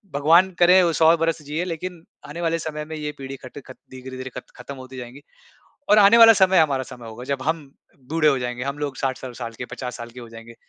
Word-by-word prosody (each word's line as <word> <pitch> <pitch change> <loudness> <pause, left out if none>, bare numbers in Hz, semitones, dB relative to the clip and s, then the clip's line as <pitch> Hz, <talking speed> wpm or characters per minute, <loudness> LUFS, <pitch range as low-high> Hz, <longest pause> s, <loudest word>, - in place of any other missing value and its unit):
भगवान 165 +6 +5
करे 180 +2 +6
वो 170 - +1
100 160 +1 +5
बरस 165 -1 -1
जिए, 150 +4 -3
लेकिन 175 0 -6 0.3
आने 170 +4 -7
वाले 165 0 0
समय 155 -1 -5
में 160 0 -7
ये 150 -1 -4
पीड़ी 135 0 -7
खटकट 130 0 -11 0.2
धीरे-धीरे 130 0 -8
खत 125 - -9
खत्म 125 +3 -9
होती 130 0 -11
जाएँगी 125 +3 -9 0.7
और 210 - +7
आने 205 +3 +7
वाला 225 -1 +10
समय, 190 -3 +4
हमारा 140 -4 +2
समय 120 -2 -10
होगा, 120 +3 -9
जब 135 -1 -3
हम 155 -2 -3 0.4
बूढ़े 160 -1 +3
हो 135 -3 +2
जाएँगे, 125 0 -4
हम 140 +1 -4
लोग 145 -2 -4
60-60 130 -2 -4
साल 115 -2 -6
के - - -4
50 125 0 -7
साल 120 0 -9
के 125 +1 -12
हो 120 - -11
जाएँगे, 115 +1 -12
140 Hz, 230 wpm, -22 LUFS, 130-165 Hz, 0.7 s, वाला